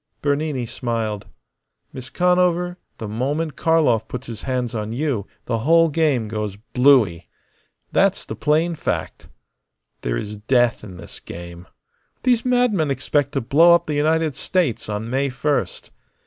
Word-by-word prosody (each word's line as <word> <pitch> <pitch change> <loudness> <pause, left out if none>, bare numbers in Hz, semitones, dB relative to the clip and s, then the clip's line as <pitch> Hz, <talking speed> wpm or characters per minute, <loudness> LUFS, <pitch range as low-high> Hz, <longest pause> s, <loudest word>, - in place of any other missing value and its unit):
Bernini 145 -3 0
smiled. 115 -3 -3 0.7
"Miss 130 -1 -8
Conover, 180 +1 +1 0.2
the 110 - -6
moment 140 +7 -2
Karlov 145 -9 +2
puts 125 +1 -6
his 115 -2 -8
hands 125 -3 -2
on 110 -1 -3
you 120 -5 -2 0.2
the 115 -2 -1
whole 165 +7 +4
game 145 -7 +1
goes 105 -2 -4 0.2
blooey. 125 -11 +4 0.6
That's - - +2
the - - -6
plain 160 +3 +1
fact. 160 - -4 0.7
There - - -1
is 105 - -5
death 120 +2 +1
in 95 -4 -10
this 90 - -11
game. 85 +1 -10 0.6
These 245 -3 +3
madmen 245 - +2
expect 140 +1 0
to 135 - 0
blow 165 +8 +6
up 170 0 0
the 155 - -3
United 155 +1 +1
States 160 - -1
on 105 +2 -3
May 135 +3 0
first. 140 +3 -2
135 Hz, 145 wpm, -21 LUFS, 110-160 Hz, 0.7 s, blow